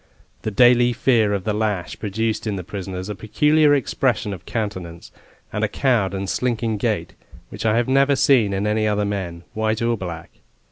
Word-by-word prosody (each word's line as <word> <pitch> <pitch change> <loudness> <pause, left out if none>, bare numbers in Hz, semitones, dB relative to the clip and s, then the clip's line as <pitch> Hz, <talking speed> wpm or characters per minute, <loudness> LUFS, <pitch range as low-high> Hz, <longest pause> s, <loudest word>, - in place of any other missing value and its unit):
The - - -2
daily 120 +2 +5
fear 115 -4 +2
of 100 -2 -1
the 105 - -1
lash 105 -4 -2
produced 110 +2 -2
in 105 - -1
the 90 - -5
prisoners 95 -1 -6
a 105 - -3
peculiar 150 - +3
expression 125 -5 0
of 90 -3 -11
countenance, 95 -7 -5 0.4
and - - -1
a - - +3
cowed 115 -8 +1
and 95 0 -3
slinking 115 -1 -1
gait, - - -2 0.4
which - - -4
I 110 +1 +3
have 120 - +1
never 135 +1 +3
seen 125 -7 +3
in 100 +1 -1
any 110 0 +1
other 105 0 +1
men, 90 -4 -4
white 110 0 0
or 115 0 +1
black. 85 -5 -7
110 Hz, 185 wpm, -21 LUFS, 100-120 Hz, 0.4 s, daily